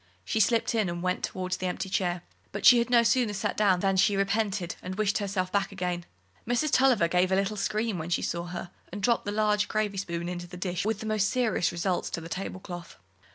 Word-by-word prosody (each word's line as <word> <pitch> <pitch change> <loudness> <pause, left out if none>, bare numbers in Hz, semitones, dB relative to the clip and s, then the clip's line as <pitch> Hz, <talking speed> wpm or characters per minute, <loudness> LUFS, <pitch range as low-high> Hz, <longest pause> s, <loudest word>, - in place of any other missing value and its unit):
She 220 - -1
slipped 230 +3 +2
in 215 -5 +1
and 175 0 -4
went 180 0 0
towards 185 0 -2
the 185 - -2
empty 180 +2 -3
chair. 180 -2 -1 0.3
But - - -4
she 245 - +9
had 235 - 0
no 240 -1 +5
sooner 230 -2 +2
sat 200 - -2
down 190 -4 +3
than 195 -1 +1
she 195 +1 +3
repented, 195 -2 0
and 185 +1 -5
wished 205 0 +1
herself 190 -2 -2
back 200 0 0
again. 180 -2 -3 0.4
Mrs. 245 +5 +1
Tulliver 255 -10 +4
gave 180 +2 +2
a - - +4
little 195 +2 0
scream 210 -2 -1
as 165 +2 -6
she - - +1
saw 170 0 -2
her, 175 0 -6 0.2
and 200 +2 -6
dropped 235 +2 +2
the 205 - -2
large 210 -1 +2
gravy 210 -2 -1
spoon 170 -3 -3
into 175 0 -5
the 180 +1 -10
dish 180 +1 -2
with 220 -1 -1
the - - -5
most 215 -2 +1
serious 240 -8 +1
results 175 +2 -1
to - - -3
the 165 0 -9
tablecloth. 180 -2 -6
195 Hz, 230 wpm, -28 LUFS, 180-215 Hz, 0.4 s, she